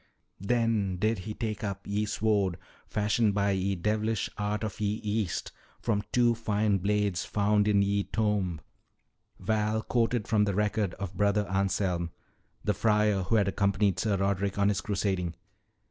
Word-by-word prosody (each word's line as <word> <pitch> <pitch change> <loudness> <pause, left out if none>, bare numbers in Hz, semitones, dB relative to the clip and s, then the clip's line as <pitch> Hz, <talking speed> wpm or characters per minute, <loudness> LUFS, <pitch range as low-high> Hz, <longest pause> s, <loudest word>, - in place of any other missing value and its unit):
"'Then 105 -2 +1
did 110 +2 +1
he 105 +4 -5
take 110 -3 -3
up 100 -1 -4
ye 105 +1 -1
sword 100 -5 +1 0.3
fashioned 105 0 +1
by 100 0 +2
ye 95 0 0
devilish 105 +3 -1
art 105 +1 -2
of 110 -2 -4
ye 105 0 0
East 105 -4 -2 0.3
from 105 -3 0
two 120 -1 +4
fine 105 -3 +1
blades 100 -2 0
found 105 0 +2
in 100 -1 +4
ye 100 +1 +1
tomb,'" 105 -7 0 0.8
Val 110 0 0
quoted 120 -2 0
from 105 -2 +3
the 100 -2 -1
record 105 -2 0
of 100 -2 -5
Brother 105 +1 +2
Anselm, 95 -2 0 0.5
the 105 - +1
friar 105 -2 +2
who 105 +5 0
had 100 -2 +3
accompanied 100 -1 +1
Sir 105 -3 +1
Roderick 100 0 0
on 100 0 +3
his 100 -1 0
crusading. 95 -4 -1
105 Hz, 155 wpm, -29 LUFS, 100-105 Hz, 0.8 s, two